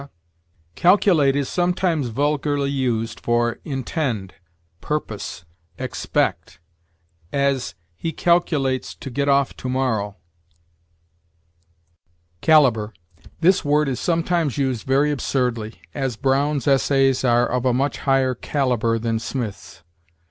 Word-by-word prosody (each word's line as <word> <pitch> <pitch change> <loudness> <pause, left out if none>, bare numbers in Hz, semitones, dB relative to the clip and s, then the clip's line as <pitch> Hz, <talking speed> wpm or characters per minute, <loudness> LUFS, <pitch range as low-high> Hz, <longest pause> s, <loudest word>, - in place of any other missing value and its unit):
Calculate 175 - +4
is 140 -2 0
sometimes 175 -5 0
vulgarly 145 +2 0
used 120 -4 -1
for 120 0 0
intend, 130 - -3 0.5
purpose, 105 - -4 0.3
expect; - - -2 0.7
as, 140 -2 0 0.2
"He 165 - -3
calculates 150 -7 +1
to 135 - -8
get 140 +3 0
off 140 -1 +2
to 130 - -5
morrow." 115 -6 -1 2.3
CALIBER. 120 - +4 0.5
This 185 +3 +4
word 150 0 +2
is 130 -2 -2
sometimes 165 -4 0
used 130 -5 -1
very 140 +3 +3
absurdly; 125 -7 -2
as, 135 -3 -2
"Brown's 140 +1 +1
Essays 135 -1 +3
are 120 -1 +3
of 125 0 -1
a 130 - +3
much 135 +4 0
higher 135 -2 +2
caliber 125 -3 0
than 115 0 -1
Smith's." 110 -8 -6
135 Hz, 105 wpm, -22 LUFS, 120-145 Hz, 2.3 s, Calculate